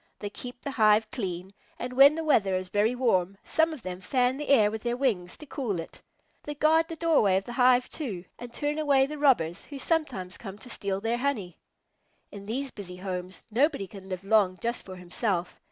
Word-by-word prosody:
They 205 Hz, -, -6 dB
keep 245 Hz, +2 st, -8 dB
the 280 Hz, -, -3 dB
hive 215 Hz, -3 st, +4 dB
clean, 190 Hz, -4 st, -4 dB, 0.2 s
and 250 Hz, +1 st, -5 dB
when 275 Hz, +3 st, +7 dB
the 325 Hz, -, -3 dB
weather 200 Hz, -11 st, +3 dB
is 185 Hz, 0 st, -3 dB
very 210 Hz, +5 st, +2 dB
warm, 195 Hz, -7 st, +1 dB
some 320 Hz, +1 st, +2 dB
of 300 Hz, -7 st, -8 dB
them 185 Hz, 0 st, -6 dB
fan 250 Hz, +5 st, +1 dB
the 295 Hz, -, -5 dB
air 215 Hz, -7 st, +5 dB
with 220 Hz, 0 st, -5 dB
their 240 Hz, +1 st, -1 dB
wings 200 Hz, -10 st, -1 dB
to 305 Hz, -, -11 dB
cool 240 Hz, -, -3 dB
it. 165 Hz, -, -9 dB, 0.4 s
They 295 Hz, -, -6 dB
guard 320 Hz, +2 st, +3 dB
the 330 Hz, -, -6 dB
doorway 300 Hz, -, +3 dB
of 195 Hz, -, -2 dB
the 240 Hz, -, -7 dB
hive, 250 Hz, 0 st, +4 dB
too, 205 Hz, -, -5 dB
and 245 Hz, 0 st, -8 dB
turn 295 Hz, +4 st, -2 dB
away 280 Hz, -3 st, +4 dB
the 300 Hz, +1 st, -7 dB
robbers 195 Hz, -, +2 dB
who 285 Hz, -, -8 dB
sometimes 265 Hz, -, -2 dB
come 195 Hz, -3 st, -8 dB
to 245 Hz, +3 st, -10 dB
steal 195 Hz, -3 st, -2 dB
their 225 Hz, +2 st, 0 dB
honey. 230 Hz, -, -2 dB, 0.7 s
In 200 Hz, -1 st, -10 dB
these 265 Hz, +4 st, -3 dB
busy 185 Hz, -3 st, -8 dB
homes, 185 Hz, 0 st, -5 dB
nobody 275 Hz, -2 st, +2 dB
can 190 Hz, 0 st, -12 dB
live 185 Hz, 0 st, -5 dB
long 195 Hz, -3 st, +3 dB
just 235 Hz, +1 st, -3 dB
for 185 Hz, -, -7 dB
himself. 180 Hz, 0 st, -2 dB
225 Hz, 210 wpm, -28 LUFS, 190-275 Hz, 0.7 s, when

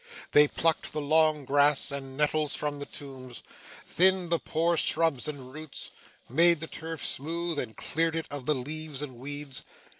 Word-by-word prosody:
They 150 Hz, 0 st, +7 dB
plucked 165 Hz, +2 st, 0 dB
the -, -, -2 dB
long 155 Hz, 0 st, +2 dB
grass 145 Hz, +1 st, +4 dB
and 135 Hz, -1 st, -5 dB
nettles 150 Hz, 0 st, +1 dB
from 145 Hz, -1 st, -3 dB
the 145 Hz, -, -6 dB
tombs, 130 Hz, -3 st, -9 dB, 0.4 s
thinned 185 Hz, -1 st, +3 dB
the 170 Hz, -, +3 dB
poor 165 Hz, +2 st, 0 dB
shrubs 160 Hz, -4 st, +2 dB
and 135 Hz, -4 st, -7 dB
roots, 155 Hz, -1 st, -7 dB, 0.4 s
made 170 Hz, 0 st, +4 dB
the 160 Hz, -, -4 dB
turf 160 Hz, -3 st, -4 dB
smooth, 165 Hz, +2 st, 0 dB
and 110 Hz, -5 st, -5 dB
cleared 165 Hz, +1 st, -1 dB
it 165 Hz, -, -2 dB
of 145 Hz, -3 st, -6 dB
the 150 Hz, -, +3 dB
leaves 150 Hz, +2 st, -3 dB
and 130 Hz, -4 st, -7 dB
weeds. 145 Hz, 0 st, -4 dB
150 Hz, 170 wpm, -28 LUFS, 140-160 Hz, 0.4 s, They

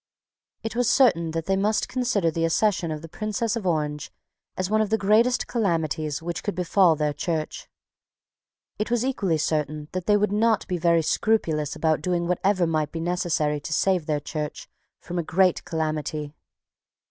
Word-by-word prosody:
It 225 Hz, 0 st, -4 dB
was 245 Hz, -1 st, +2 dB
certain 170 Hz, -, +4 dB
that 165 Hz, 0 st, -3 dB
they 195 Hz, -, +1 dB
must 210 Hz, +2 st, +1 dB
consider 240 Hz, -9 st, 0 dB
the 165 Hz, +1 st, -2 dB
accession 175 Hz, +1 st, +1 dB
of 155 Hz, 0 st, -5 dB
the -, -, -7 dB
Princess 215 Hz, +5 st, -2 dB
of 215 Hz, -5 st, -3 dB
Orange 150 Hz, -3 st, -1 dB, 0.5 s
as 185 Hz, -, -1 dB
one 215 Hz, +2 st, +2 dB
of 215 Hz, -, 0 dB
the 220 Hz, -, +2 dB
greatest 220 Hz, +5 st, +3 dB
calamities 160 Hz, -, -1 dB
which 170 Hz, 0 st, -4 dB
could 205 Hz, -, -3 dB
befall 180 Hz, -1 st, +3 dB
their 150 Hz, -1 st, 0 dB
Church. 155 Hz, +1 st, -3 dB, 1.1 s
It 210 Hz, -, -1 dB
was 240 Hz, 0 st, +1 dB
equally 195 Hz, -11 st, 0 dB
certain 150 Hz, -1 st, -2 dB
that 185 Hz, -1 st, -4 dB
they 210 Hz, -1 st, +5 dB
would 210 Hz, 0 st, +1 dB
not 220 Hz, +1 st, +2 dB
be 180 Hz, -2 st, -2 dB
very 170 Hz, -1 st, +3 dB
scrupulous 160 Hz, -5 st, 0 dB
about 160 Hz, -1 st, +1 dB
doing 175 Hz, -2 st, -1 dB
whatever 185 Hz, +1 st, +1 dB
might 155 Hz, -2 st, -1 dB
be 165 Hz, -, -5 dB
necessary 165 Hz, -3 st, 0 dB
to 150 Hz, +2 st, -5 dB
save 180 Hz, -1 st, +1 dB
their 150 Hz, -2 st, 0 dB
Church 150 Hz, +1 st, -5 dB, 0.3 s
from 175 Hz, +1 st, -4 dB
a -, -, -1 dB
great 180 Hz, +3 st, +2 dB
calamity. 155 Hz, -2 st, -3 dB
170 Hz, 175 wpm, -25 LUFS, 155-205 Hz, 1.1 s, they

